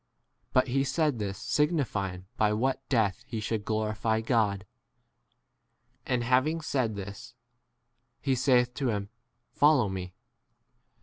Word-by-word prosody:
But 130 0 +3
he 135 +2 +2
said 150 -2 0
this 100 -2 -3
signifying 105 - -1
by 105 -2 +2
what 130 +4 -1
death 110 -7 +1
he 115 - -4
should 110 -1 -2
glorify 110 +1 0
God. 110 -4 +1 1.4
And 125 -2 +1
having 130 +7 +2
said 130 -8 -1
this, 100 0 -8 0.8
he 135 - 0
saith 125 -1 +3
to 130 -1 -1
him, 100 -2 -2 0.4
Follow 145 -7 +4
me. 90 -1 -6
115 Hz, 120 wpm, -29 LUFS, 105-135 Hz, 1.4 s, Follow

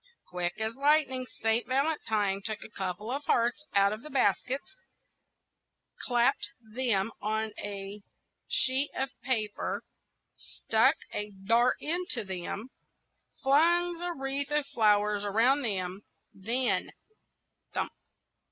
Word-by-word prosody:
Quick 175 -1 -2
as 220 +1 -2
lightning, 275 -3 +2
Saint 225 0 0
Valentine 220 -8 +1
took 215 +1 -4
a - - -11
couple 190 +4 -4
of 280 +3 -2
hearts 240 +6 +1
out 200 +1 +5
of 215 - -6
the 305 - -9
basket, 265 -1 +1 1.5
clapped 245 +2 +2
them 225 -2 -1
on 220 +1 -1
a 200 0 -5 0.5
sheet 265 +2 +2
of 265 0 -1
paper, 215 -5 -1 0.5
stuck 230 +7 +2 0.2
a 210 0 -2 0.2
dart 235 +4 +4
into 330 -7 0
them, 190 +4 -5 0.7
flung 340 +5 +4
a 350 0 -1
wreath 270 0 -2
of 295 -1 +1
flowers 210 -3 +2
round 235 +8 +3
them, 190 -3 -2 0.3
then, 235 +6 0 0.8
thump! - - -1
230 Hz, 115 wpm, -30 LUFS, 210-270 Hz, 1.5 s, out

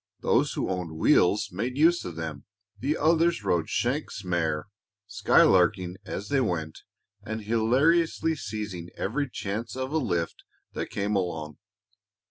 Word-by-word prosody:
Those - - +2
who - - -2
owned 90 -4 -4
wheels 100 +5 +3
made 120 +8 -3
use 170 +3 +4
of 85 - -6
them; 80 -3 -6 0.3
the 145 +5 0
others 165 -3 +2
rode 85 -4 0
"shanks' 120 -3 -1
mare," 80 -4 -1 0.4
skylarking 90 -1 +3
as 100 +2 -5
they 140 -2 +2
went 80 -8 -2 0.4
and 110 +1 -5
hilariously 140 +10 +2
seizing 105 - -5
every 140 +7 -1
chance 110 +2 -4
of 130 +1 -3
a 160 - +1
lift 85 - -2 0.3
that - - -4
came 100 +1 -1
along. 80 -5 -3
105 Hz, 135 wpm, -27 LUFS, 85-130 Hz, 0.4 s, use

